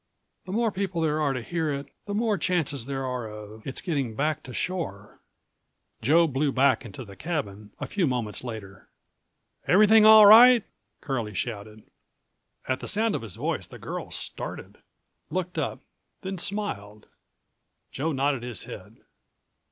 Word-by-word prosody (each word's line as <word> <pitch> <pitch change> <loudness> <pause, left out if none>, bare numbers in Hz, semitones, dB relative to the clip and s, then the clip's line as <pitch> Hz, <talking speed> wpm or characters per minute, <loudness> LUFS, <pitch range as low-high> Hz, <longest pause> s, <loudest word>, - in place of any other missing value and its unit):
"The 185 - -7
more 225 +2 +1
people 190 -3 -2
there 155 -1 +1
are 145 -2 +2
to 125 -3 -3
hear 160 +2 -2
it, 140 0 -5 0.2
the 205 - -3
more 220 -1 +1
chances 155 -10 -1
there 135 -1 -3
are 125 -3 -3
of 105 +1 -10
its 135 - -3
getting 140 -10 -2
back 150 +2 0
to 125 - -10
shore." 125 - -4 0.8
Joe 160 +9 +5
blew 140 -1 0
back 130 -2 +3
into 115 +3 -8
the 100 -1 -12
cabin 105 - -4
a - - -3
few 190 -6 0
moments 120 -5 -2
later. 105 -5 -8 0.8
"Everything 215 +3 +6
all 215 -1 +9
right?" 235 +2 +9 0.4
Curlie 120 -7 -3
shouted. 110 -1 -5 0.8
At 130 -1 0
the - - -7
sound 220 +2 +1
of - - -2
his 110 -6 -7
voice, - - -3
the - - -11
girl - - -6
started, - - -7 0.5
looked 180 +2 -3
up, - - -3 0.4
then 190 -1 -5
smiled; 110 - -4 0.9
Joe 155 +4 -2
nodded 135 -2 0
his 120 -2 -4
head. - - -10
140 Hz, 155 wpm, -26 LUFS, 115-185 Hz, 0.9 s, all